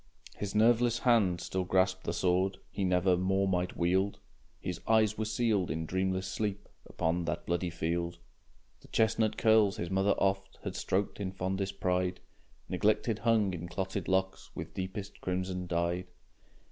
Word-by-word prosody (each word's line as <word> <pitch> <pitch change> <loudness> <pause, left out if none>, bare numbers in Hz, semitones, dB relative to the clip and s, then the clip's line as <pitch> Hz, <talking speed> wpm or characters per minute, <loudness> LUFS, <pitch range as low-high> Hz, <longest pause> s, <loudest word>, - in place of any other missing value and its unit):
His 100 0 -4
nerveless 120 +2 +4
hand 110 -8 +3
still 95 +1 -2
grasped 95 0 +1
the - - 0
sword. 90 +2 +1
He 100 - -2
never 90 0 +3
more 95 +2 +1
might 90 -1 -1
wield, 95 +3 +1 0.4
His - - -5
eyes 110 -1 +4
were 110 - -2
sealed 110 -4 +1
in 80 +3 -2
dreamless 95 +2 -1
sleep 100 +1 -3 0.2
Upon 85 +1 -1
that 75 +1 -3
bloody 85 +1 0
field. 85 +1 -2 0.6
The - - -17
chestnut 110 0 +1
curls 110 -3 +4
his 85 +1 -4
mother 95 +1 +3
oft 95 0 0
Had - - -4
stroked 100 +2 -1
in 95 -2 -2
fondest 95 +1 -3
pride, 90 0 0 0.5
Neglected 110 +1 +1
hung 110 -4 +2
in 85 0 -5
clotted 95 +1 -3
locks, 95 0 0
With - - -6
deepest 95 +2 -6
crimson 90 0 -2
dyed. 85 +1 -1
95 Hz, 155 wpm, -31 LUFS, 90-100 Hz, 0.6 s, nerveless